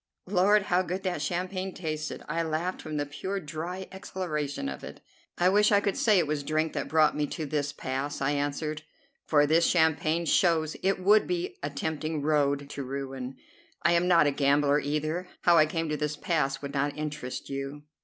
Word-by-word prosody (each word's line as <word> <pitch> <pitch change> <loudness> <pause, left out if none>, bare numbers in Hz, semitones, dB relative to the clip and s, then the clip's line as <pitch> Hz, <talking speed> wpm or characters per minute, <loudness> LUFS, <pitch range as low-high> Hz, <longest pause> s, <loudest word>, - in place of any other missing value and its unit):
Lord, 200 +2 +4
how 180 -1 +2
good 185 +2 -4
that 180 -5 -2
champagne 185 +4 -3
tasted! 155 -3 -4
I 165 +2 -1
laughed 165 +3 -2
from 155 -1 -5
the 145 - 0
pure, 190 +7 -4
dry 170 +4 -5
exhilaration 155 - -4
of 70 -1 -6
it. - - -9 0.4
"I 175 - +3
wish 210 +2 +4
I 205 - +6
could 200 -1 -1
say 215 -3 +4
it 175 - +3
was 150 -1 -1
drink 155 +2 -1
that - - -2
brought 155 -1 +3
me 150 0 0
to 155 - -4
this 145 0 -1
pass," 140 +1 -4
I 135 +1 +1
answered; 145 +2 -2 0.5
"for 145 -2 +4
this 160 +3 +3
champagne 160 0 +2
shows 160 -3 +2
it 195 0 +1
would 205 +3 +4
be 175 -1 -2
a 145 - -2
tempting 155 +1 -3
road 145 -2 +1
to 140 - -5
ruin. 135 -1 -5 0.5
I 170 - +4
am 175 +1 +3
not 170 -4 +5
a 145 - +3
gambler, 145 +1 +3
either. 155 +5 -2
How 175 -1 +5
I 155 -1 +6
came 165 +1 -2
to 150 - -1
this 150 0 -2
pass 145 -5 -1
would 140 0 -5
not 145 +1 -1
interest 145 -4 -5
you." 140 +2 -5
155 Hz, 195 wpm, -28 LUFS, 145-175 Hz, 0.5 s, I